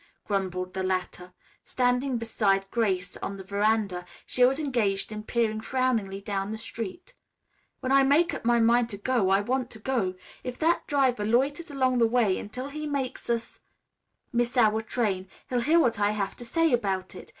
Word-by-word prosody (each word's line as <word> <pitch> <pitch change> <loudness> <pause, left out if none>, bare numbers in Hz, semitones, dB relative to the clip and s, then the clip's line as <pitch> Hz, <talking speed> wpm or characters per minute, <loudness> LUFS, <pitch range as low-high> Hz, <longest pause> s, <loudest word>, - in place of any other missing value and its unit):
grumbled 185 -2 -2
the 190 - -2
latter. 185 -1 -2 0.3
Standing 250 +1 +1
beside 205 -4 +1
Grace 190 -6 0
on 195 - -5
the 190 - -8
veranda, 200 -2 0 0.2
she 250 - +2
was 265 +4 +4
engaged 230 -10 0
in 215 0 -5
peering 220 -1 0
frowningly 225 -6 0
down 200 -1 -3
the 220 - -4
street. 230 - -7 0.7
"When 260 - -2
I 275 0 +6
make 290 +6 +3
up - - -5
my 235 0 +3
mind 235 +1 +4
to 200 - -6
go, 215 -2 +1
I 195 +1 +4
want 250 +3 -1
to - - -8
go. 215 -6 -1 0.3
If 250 -1 -5
that 335 +2 +1
driver 260 -6 +2
loiters 275 +9 +1
along 260 -3 +1
the 230 - +5
way 225 -5 +2
until 250 +6 -6
he 305 +1 -5
makes 275 -5 -3
us 230 -1 -2 0.7
miss 240 +1 0
our 220 -2 +4
train, 205 -5 -1 0.2
he'll 250 - +2
hear 315 +7 +4
what 230 -8 +2
I 205 0 +3
have 200 -1 -2
to 240 - -8
say 330 +3 +2
about 195 -5 -1
it. - - -11
230 Hz, 185 wpm, -27 LUFS, 200-255 Hz, 0.7 s, I